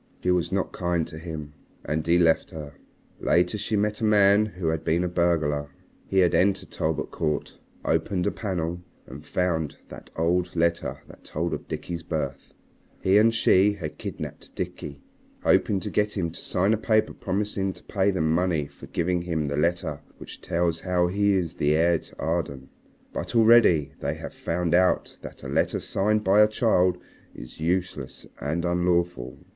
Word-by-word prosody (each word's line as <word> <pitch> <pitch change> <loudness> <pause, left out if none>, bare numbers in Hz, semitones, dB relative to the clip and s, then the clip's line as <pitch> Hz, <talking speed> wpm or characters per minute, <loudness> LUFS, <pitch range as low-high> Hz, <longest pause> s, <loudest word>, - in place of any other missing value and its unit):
She 90 - +2
was 90 -1 +1
not 95 0 -1
kind 85 -2 0
to 80 - -8
him. 80 -3 -7 0.3
And 80 +1 -2
he 85 +1 +5
left 85 -2 +3
her. 75 -3 -8 0.5
Later 90 +3 +2
she 110 - -2
met 105 +2 0
a - - -2
man 105 0 +5
who 90 -5 -3
had 80 -1 -2
been 85 +3 +1
a - - 0
burglar. 80 -5 0 0.4
He 95 - -2
had 90 -2 +4
entered 95 +1 +2
Talbot 80 -1 -2
Court, 75 -2 -2 0.3
opened 90 -3 0
a - - +1
panel, 90 -4 -3 0.2
and 70 +4 -10
found 80 -5 -1
that - - -11
old 90 +2 0
letter 85 0 0
that - - -15
told 85 +3 -3
of - - -5
Dickie's 85 -1 -5
birth. 80 -5 -4 0.5
He 95 +2 +4
and 115 +2 +5
she 105 -2 +4
have 85 -7 -7
kidnapped - - -7
Dickie, 70 -1 -6 0.4
hoping 100 - +3
to - - -5
get 105 0 +1
him 85 -3 -1
to - - -10
sign 95 +4 +1
a - - +2
paper 110 0 +1
promising 100 0 -2
to - - -16
pay 100 0 +1
them 80 -5 +1
money 85 -3 +1
for - - -13
giving 90 +1 0
him 85 -3 -2
the 70 - -2
letter 85 +4 0 0.2
which - - -11
tells 85 -1 0
how 90 -1 +1
he 100 +2 +2
is 90 -3 -1
heir 80 +3 +3
to - - -17
Arden. 70 -5 -2 0.4
But - - -4
already 110 -10 +5
they - - -2
have - - -8
found 85 0 -2
out 90 +1 +2
that - - -10
a - - -5
letter - - 0
signed 105 +2 0
by 100 +2 +5
a 105 - +7
child 95 -5 +2 0.4
is - - -11
useless 90 +3 -2
and 80 +4 -2
unlawful. 85 -7 0
90 Hz, 175 wpm, -25 LUFS, 80-95 Hz, 0.5 s, a